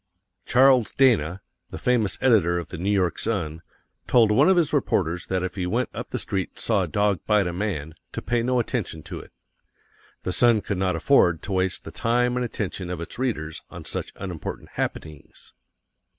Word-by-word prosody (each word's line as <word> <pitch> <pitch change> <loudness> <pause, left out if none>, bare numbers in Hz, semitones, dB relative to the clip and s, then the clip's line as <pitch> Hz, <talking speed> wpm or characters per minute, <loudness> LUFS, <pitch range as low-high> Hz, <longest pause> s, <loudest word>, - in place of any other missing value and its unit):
Charles 130 -2 +5
Dana, 100 - +3 0.3
the - - -7
famous 120 -5 +1
editor 100 -9 +4
of 85 - -5
The - - -7
New 95 +3 -1
York 90 -5 +1
Sun, 85 -8 -2 0.5
told 115 -3 +5
one 105 - +5
of 190 - +4
his 165 -4 +2
reporters 85 +2 0
that 95 -1 -1
if 95 - -3
he 95 -2 -3
went 90 - 0
up - - -6
the - - -3
street 95 -2 -2
and - - -25
saw 110 -4 +1
a 90 - -1
dog 100 +1 +1
bite 105 -2 +3
a 90 - -2
man, 85 -5 -3 0.2
to - - -3
pay 120 -1 0
no 125 +1 +1
attention 110 - -3
to - - -7
it. - - -13 0.9
The 90 - -2
Sun 115 +2 +4
could 100 -2 -3
not 95 -2 +1
afford 90 - +3
to 100 - -6
waste 95 0 0
the - - -8
time 125 +1 +1
and 125 - 0
attention 100 -6 -4
of 90 -2 -4
its 85 +7 -7
readers 80 -12 -2
on - - -10
such - - -4
unimportant 90 -5 -6
happenings. 75 -3 -6
100 Hz, 195 wpm, -24 LUFS, 85-120 Hz, 0.9 s, Charles